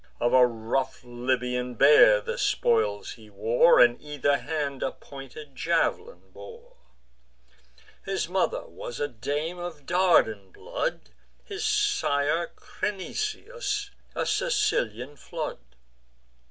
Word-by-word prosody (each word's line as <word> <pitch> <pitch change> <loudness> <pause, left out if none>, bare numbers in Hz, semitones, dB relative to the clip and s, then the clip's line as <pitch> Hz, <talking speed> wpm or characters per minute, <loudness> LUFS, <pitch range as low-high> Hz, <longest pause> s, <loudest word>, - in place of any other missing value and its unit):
Of 120 +1 +1
a 125 -1 +7
rough 120 +4 -3
Libyan 125 0 -2
bear 125 -6 +7
the - - -4
spoils 105 -3 +1
he 110 -2 -13
wore, 110 +11 +4
And 120 0 +5
either 145 -1 0
hand 145 -3 -3
a - - -1
pointed 140 +1 -11
jav'lin 305 - -1
bore. 475 +1 -13 1.3
His - - -2
mother - - -1
was 120 - -8
a 145 - 0
dame 145 +8 -4
of 165 -5 -7
Dardan 165 - +2
blood; - - -4 0.3
His 405 +1 -6
sire 400 - +1
Crinisus, 420 - -4 0.2
a - - -1
Sicilian 145 - 0
flood. - - -5
145 Hz, 110 wpm, -26 LUFS, 120-200 Hz, 1.3 s, a